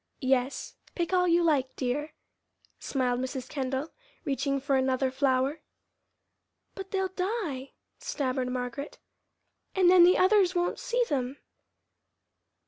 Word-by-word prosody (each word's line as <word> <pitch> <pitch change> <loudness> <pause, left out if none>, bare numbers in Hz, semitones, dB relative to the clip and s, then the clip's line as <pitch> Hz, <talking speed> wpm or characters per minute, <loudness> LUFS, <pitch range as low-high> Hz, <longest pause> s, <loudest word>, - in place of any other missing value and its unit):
"Yes, 260 0 0 0.2
pick 345 +1 -2
all 360 -1 +3
you 340 0 +4
like, 275 -6 +1
dear," 290 +4 -2 0.7
smiled 250 -3 -1
Mrs. 260 0 -4
Kendall, 270 +1 -3 0.3
reaching 275 -1 0
for 275 0 0
another 260 0 +1
flower. 265 +2 +1 1.1
"But 385 0 -8
they'll 385 -1 -1
die," 365 - -3 0.3
stammered 260 -3 -2
Margaret, 250 +3 -4 0.8
"and 365 -2 +5
then 365 -1 +8
the 360 +1 +6
others 375 -1 +4
won't 350 0 0
see - - 0
them." 265 -2 -2
280 Hz, 120 wpm, -28 LUFS, 260-355 Hz, 1.1 s, then